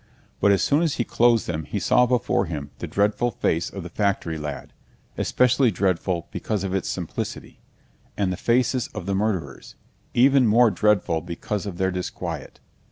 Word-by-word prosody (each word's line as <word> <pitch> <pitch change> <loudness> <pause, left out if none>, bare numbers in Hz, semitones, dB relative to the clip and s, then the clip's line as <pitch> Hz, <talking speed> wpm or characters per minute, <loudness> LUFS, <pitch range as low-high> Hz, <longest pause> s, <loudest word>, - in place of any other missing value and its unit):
But 100 - +4
as 100 - +3
soon 145 +3 +3
as 165 -4 +1
he 120 - 0
closed 120 -1 +3
them 80 -2 -3
he - - -4
saw 125 0 +3
before 120 -5 +1
him 75 -3 -5
the - - -4
dreadful 105 +4 +1
face 85 -6 -1
of 95 - -7
the 90 - -7
factory 100 -5 -1
lad—especially 125 - -1
dreadful 90 -2 -1
because 105 -3 -3
of 95 -1 -3
its 95 - -1
simplicity—and 95 -3 -6
the - - -3
faces 120 +4 +1
of - - -5
the 100 - -1
murderers, 95 -9 -2 0.4
even 130 0 +5
more 115 +1 +5
dreadful 100 -7 +1
because 90 +5 -4
of 90 -3 -6
their 95 0 +1
disquiet. 90 0 -5
100 Hz, 165 wpm, -24 LUFS, 90-120 Hz, 0.4 s, even